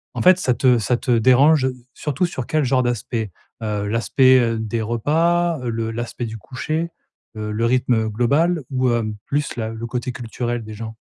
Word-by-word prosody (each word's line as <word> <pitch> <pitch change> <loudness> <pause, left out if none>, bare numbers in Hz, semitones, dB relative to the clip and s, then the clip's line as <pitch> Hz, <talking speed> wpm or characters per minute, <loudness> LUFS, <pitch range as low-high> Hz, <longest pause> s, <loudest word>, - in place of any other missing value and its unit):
en - - -2
fait, 185 0 +6
ça 125 -8 +1
te 125 -1 +3
ça 110 +4 +1
te 125 - -2
dérange 130 +4 +5 0.3
surtout 150 +4 -1
sur 130 -8 -5
quel 155 -1 +1
genre 130 0 +2
d'aspect? 115 -3 -2 0.3
Heu, 105 -2 -2
l'aspect, 130 +4 +4
heu, 115 -2 +1
des 110 +1 -2
repas? 165 +8 +1
Heu, 125 - -3
le 115 0 -2
l'aspect 120 +1 -4
du 110 -1 -6
coucher? 155 - -3 0.5
Heu, 105 0 -4
le 115 +2 0
rythme 120 -2 +2
global? 145 +10 +1
Ou, 130 -1 +1
hem, 110 -2 -1
plus 145 -1 -2
la 110 -1 -2
le 115 +1 -6
côté 125 +1 -3
culturel 120 0 -4
des 110 0 -9
gens? 110 +1 -7
120 Hz, 190 wpm, -21 LUFS, 115-135 Hz, 0.5 s, fait